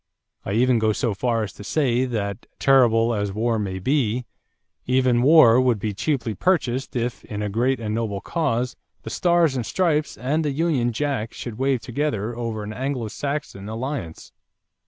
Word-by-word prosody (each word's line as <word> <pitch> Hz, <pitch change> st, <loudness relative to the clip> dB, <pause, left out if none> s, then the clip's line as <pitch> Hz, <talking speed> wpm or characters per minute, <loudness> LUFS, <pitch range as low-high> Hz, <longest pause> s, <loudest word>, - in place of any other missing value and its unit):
I 95 Hz, -, -3 dB
even 120 Hz, +1 st, +3 dB
go 110 Hz, -1 st, +2 dB
so 115 Hz, -1 st, -1 dB
far 115 Hz, +2 st, 0 dB
as 105 Hz, -, -6 dB
to -, -, -11 dB
say 130 Hz, +1 st, +1 dB
that, 105 Hz, -3 st, -4 dB
terrible 120 Hz, -4 st, +4 dB
as 100 Hz, -2 st, -1 dB
war 115 Hz, +2 st, 0 dB
may 95 Hz, -2 st, -3 dB
be, 125 Hz, +2 st, 0 dB, 0.6 s
even 125 Hz, -1 st, +3 dB
war 130 Hz, -4 st, +7 dB
would 125 Hz, -3 st, +2 dB
be 105 Hz, +1 st, -3 dB
cheaply 120 Hz, 0 st, -1 dB
purchased 135 Hz, -, 0 dB
if, 120 Hz, 0 st, -2 dB
in 105 Hz, -1 st, -4 dB
a 105 Hz, -, -2 dB
great 125 Hz, +5 st, +1 dB
and 110 Hz, -2 st, -3 dB
noble 110 Hz, -3 st, -2 dB
cause, 125 Hz, -, -1 dB, 0.3 s
the 110 Hz, -, -6 dB
Stars 170 Hz, -1 st, +2 dB
and 125 Hz, -, -1 dB
Stripes 155 Hz, -, 0 dB
and 140 Hz, +8 st, 0 dB
the 150 Hz, -, 0 dB
Union 140 Hz, -5 st, +1 dB
Jack 125 Hz, -3 st, -2 dB
should 120 Hz, -2 st, -7 dB
wave 135 Hz, -2 st, +1 dB
together 120 Hz, -4 st, -2 dB
over 115 Hz, -3 st, -4 dB
an 105 Hz, +1 st, -6 dB
Anglo 130 Hz, -2 st, -3 dB
Saxon 140 Hz, -5 st, -4 dB
alliance." 115 Hz, -, -5 dB
120 Hz, 175 wpm, -23 LUFS, 110-135 Hz, 0.6 s, war